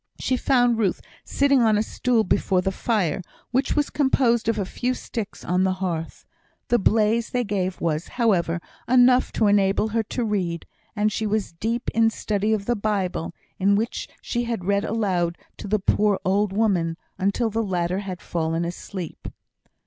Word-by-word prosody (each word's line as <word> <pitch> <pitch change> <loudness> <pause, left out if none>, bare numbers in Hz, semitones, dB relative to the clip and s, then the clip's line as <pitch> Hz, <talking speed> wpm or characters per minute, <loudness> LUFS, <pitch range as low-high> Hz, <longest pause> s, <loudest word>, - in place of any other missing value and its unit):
She 260 - 0
found 245 -3 +2
Ruth 200 -5 +1 0.2
sitting 280 -2 +2
on 220 -2 +4
a 210 - +2
stool 235 0 +1
before 185 -1 +1
the 190 - -1
fire, 195 -5 0 0.3
which 260 +3 +1
was 295 -1 +1
composed 240 -5 +2
of 225 - +1
a 200 - -1
few 250 +7 -2
sticks 225 -4 -6
on 180 +2 +1
the 190 0 +2
hearth. 175 -4 -4 0.4
The 240 - +4
blaze 220 +2 +2
they 250 0 0
gave 190 -4 -2
was, 160 0 -1
however, 180 -8 +1 0.3
enough 250 0 +5
to 220 - +2
enable 200 +1 +3
her 225 +1 +1
to 230 +3 -3
read; 180 -6 -2 0.3
and 210 0 +1
she 215 +1 -2
was 210 -4 -1
deep 230 +8 -2
in 225 0 +4
study 210 -1 -1
of 210 -2 0
the 240 - +1
Bible, 195 -6 -2 0.2
in 200 +1 +4
which 225 +3 -2 0.2
she 240 0 -2
had 230 -6 -3
read 200 +1 +1
aloud 185 -6 0 0.2
to - - -7
the 215 +2 +2
poor 205 0 +2
old 195 +2 +2
woman, 190 -6 +1 0.2
until 200 +4 0
the 225 +2 0
latter 180 -3 -1
had 190 -3 -6
fallen 165 0 -1
asleep. 175 0 -6
210 Hz, 175 wpm, -24 LUFS, 185-230 Hz, 0.4 s, enough